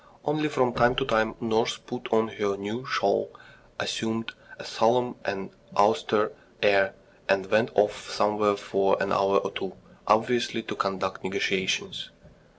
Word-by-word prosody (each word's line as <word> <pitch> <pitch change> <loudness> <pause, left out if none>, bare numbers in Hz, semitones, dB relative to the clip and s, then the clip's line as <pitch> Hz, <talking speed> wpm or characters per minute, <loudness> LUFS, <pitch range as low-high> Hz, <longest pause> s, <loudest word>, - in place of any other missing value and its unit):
Only 150 +1 0
from 130 -4 +1
time 120 +2 +4
to 135 - 0
time 110 -2 +1
nurse 115 0 +1
put 125 0 -8
on 110 0 +3
her 100 -2 -2
new 110 +7 -5
shawl, 100 -6 +1 0.5
assumed 115 0 -2 0.3
a - - -10
solemn 125 +2 +2
and 95 -1 -4 0.3
austere - - +3 0.3
air, 100 -1 +4 0.3
and 95 -1 +3
went 110 +4 +3
off 105 +1 +1
somewhere 105 0 +2
for 100 -1 +1
an - - -1
hour 100 0 +3
or - - -1
two, - - -5 0.3
obviously 115 +1 +2
to - - -5
conduct 95 -1 -2
negotiations. 95 0 -1
110 Hz, 145 wpm, -27 LUFS, 100-120 Hz, 0.5 s, time